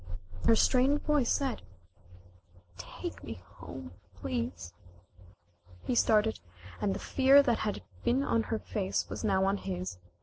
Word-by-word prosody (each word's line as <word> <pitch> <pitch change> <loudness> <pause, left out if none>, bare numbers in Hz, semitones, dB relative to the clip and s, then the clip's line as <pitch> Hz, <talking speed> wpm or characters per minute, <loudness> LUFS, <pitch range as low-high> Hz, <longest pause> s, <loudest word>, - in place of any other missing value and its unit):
When 90 - -5
her 225 - +7
strained 265 +5 +3
voice 295 -5 +2
said: 270 -4 0 1.1
"Take 90 +1 -7
me - - -6
home, 85 -1 -10 0.2
please," 90 -2 -4 1.1
he - - -1
started 220 -2 +3 0.4
and 200 -2 +1
the - - -4
fear 275 +1 +5
that 240 -5 +1
had 210 - -2 0.2
been 265 +3 +2
on 230 -4 +2
her 225 - 0
face 195 -3 -2
was - - -5
now 190 -3 +2
on 195 +1 +1
his. 180 - -5
210 Hz, 140 wpm, -31 LUFS, 175-255 Hz, 1.1 s, her